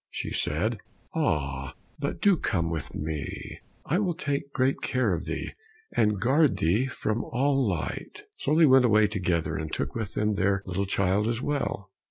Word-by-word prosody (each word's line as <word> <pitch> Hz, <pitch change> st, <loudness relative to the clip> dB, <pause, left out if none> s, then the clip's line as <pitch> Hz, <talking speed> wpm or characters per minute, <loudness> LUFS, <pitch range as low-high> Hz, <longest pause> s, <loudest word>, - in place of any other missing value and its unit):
She -, -, -4 dB
said, -, -, 0 dB, 0.3 s
"Ah, 70 Hz, -3 st, -1 dB, 0.2 s
but -, -, -3 dB
do 200 Hz, -2 st, +6 dB
come 85 Hz, -, -1 dB
with 80 Hz, -3 st, -4 dB
me, 75 Hz, -1 st, -5 dB, 0.3 s
I 170 Hz, +6 st, +1 dB
will 185 Hz, -5 st, 0 dB
take 140 Hz, -4 st, -2 dB
great 130 Hz, 0 st, +1 dB
care 125 Hz, -7 st, +1 dB
of 85 Hz, +1 st, -3 dB
thee, -, -, -4 dB, 0.4 s
and 105 Hz, -2 st, +2 dB
guard 140 Hz, +6 st, +3 dB
thee 105 Hz, +11 st, +2 dB
from 110 Hz, -3 st, -2 dB
all 135 Hz, -1 st, +1 dB
light." 80 Hz, -7 st, -4 dB, 0.2 s
So 150 Hz, -, +1 dB
they 165 Hz, 0 st, +7 dB
went 130 Hz, -2 st, +6 dB
away 110 Hz, -2 st, +5 dB
together, 90 Hz, -5 st, -1 dB
and 80 Hz, -1 st, -4 dB
took -, -, -2 dB
with 110 Hz, -2 st, -4 dB
them 105 Hz, 0 st, +1 dB
their 100 Hz, -1 st, +1 dB
little 95 Hz, +1 st, -2 dB
child 100 Hz, +2 st, +1 dB
as 115 Hz, 0 st, 0 dB
well. 130 Hz, -8 st, -2 dB
105 Hz, 175 wpm, -27 LUFS, 90-135 Hz, 0.4 s, they